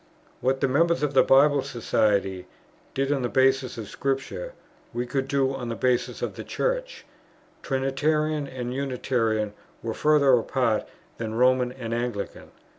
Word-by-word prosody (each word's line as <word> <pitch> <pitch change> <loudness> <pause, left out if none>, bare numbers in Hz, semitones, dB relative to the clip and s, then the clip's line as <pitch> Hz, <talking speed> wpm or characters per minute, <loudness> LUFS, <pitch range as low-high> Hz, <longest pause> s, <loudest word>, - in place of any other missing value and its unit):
What 130 +1 0
the 135 - +3
members 165 +4 +2
of 145 -1 0
the 135 - +6
Bible 140 +1 +5
Society 100 -6 0 0.5
did 135 +1 0
on 140 -2 +1
the 120 - -1
basis 130 -1 +2
of 110 -3 -6
Scripture, 135 - -3 0.4
we 120 +1 -1
could 130 +1 -2
do 135 -1 +1
on 125 -3 -5
the 115 - -2
basis 125 0 0
of - - -2
the - - -7
Church; - - -2 0.6
Trinitarian 145 +3 0
and 125 -2 -5
Unitarian 120 -5 -1 0.3
were 115 -1 -2
further 145 -1 +4
apart 120 -2 +1 0.3
than 110 -1 -3
Roman 125 +1 +3
and 120 -3 -5
Anglican. 120 -3 -4
130 Hz, 150 wpm, -25 LUFS, 120-140 Hz, 0.6 s, the